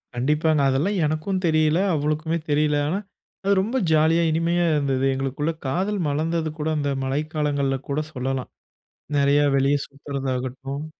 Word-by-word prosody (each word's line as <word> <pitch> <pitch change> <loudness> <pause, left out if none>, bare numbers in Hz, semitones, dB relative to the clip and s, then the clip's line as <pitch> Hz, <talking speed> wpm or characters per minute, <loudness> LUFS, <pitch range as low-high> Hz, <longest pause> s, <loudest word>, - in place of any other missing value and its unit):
கண்டிப்பாங்க! 150 +4 +2
அதெல்லாம் 160 +10 +1
எனக்கும் 155 +5 -1
தெரியல 155 0 +3
அவளுக்குமே 155 +2 0
தெரியல. 150 0 +2
ஆனா, 180 - 0 0.5
அது 200 +1 +3
ரொம்ப 230 +6 -1
ஜாலியா 160 +2 +4
இனிமையா 170 +2 +1
இருந்தது. 135 -3 +1
எங்களுக்குள்ள 135 +4 -1 0.2
காதல் 190 +9 -1
மலர்ந்தது 160 +2 -1
கூட 150 - -2
அந்த 145 -1 -1
மழைக்காலங்கள்ல 145 -1 -1
கூட 140 +2 0
சொல்லலாம். 130 0 -3 0.7
நெறையா 140 +1 +4
வெளிய 135 +2 +3
சுத்துறதாகட்டும். 135 0 -4
150 Hz, 125 wpm, -23 LUFS, 135-160 Hz, 0.7 s, ஜாலியா